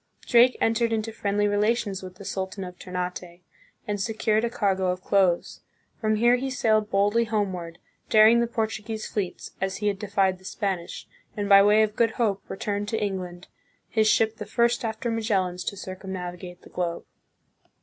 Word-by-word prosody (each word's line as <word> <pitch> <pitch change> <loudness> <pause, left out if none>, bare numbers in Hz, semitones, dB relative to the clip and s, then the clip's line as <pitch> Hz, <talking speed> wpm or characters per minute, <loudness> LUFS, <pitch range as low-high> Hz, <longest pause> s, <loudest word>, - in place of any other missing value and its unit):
Drake 245 +1 +5
entered 230 +1 +1
into 225 0 -1
friendly 205 -1 0
relations 205 -1 0
with 185 -1 -9
the 200 - -12
sultan 190 0 -4
of 180 -1 -9
Ternate, 180 -1 -5 0.5
and 205 -1 -2
secured 220 +1 0
a 235 - +1
cargo 195 -5 0
of 180 0 -2
cloves. 185 -3 +1 0.4
From 215 -2 +1
here 240 +3 +4
he 265 +2 -3
sailed 220 -4 +1
boldly 205 +4 +2
homeward, 185 -6 -2 0.3
daring 220 +2 +7
the 235 - +1
Portuguese 220 -1 -3
fleets, 195 -4 -4
as 190 0 -1
he 210 0 0
had 200 -1 -3
defied 195 -2 +1
the - - -21
Spanish, 190 -3 -4 0.3
and 205 -1 -1
by 200 -1 +8
way 210 +2 +5
of 215 -1 -2
Good 230 -2 +2
Hope 205 -5 0
returned 205 +1 -3
to 225 - -1
England, 185 -3 -4 0.4
his 220 -1 +2
ship 220 0 +3
the 210 - -6
first 235 +3 +1
after 225 +1 -2
Magellan's 190 -6 -1
to 200 - -3
circum 190 0 -7
navigate 180 0 -7
the - - -14
globe. 175 -1 -3
205 Hz, 175 wpm, -25 LUFS, 185-220 Hz, 0.5 s, by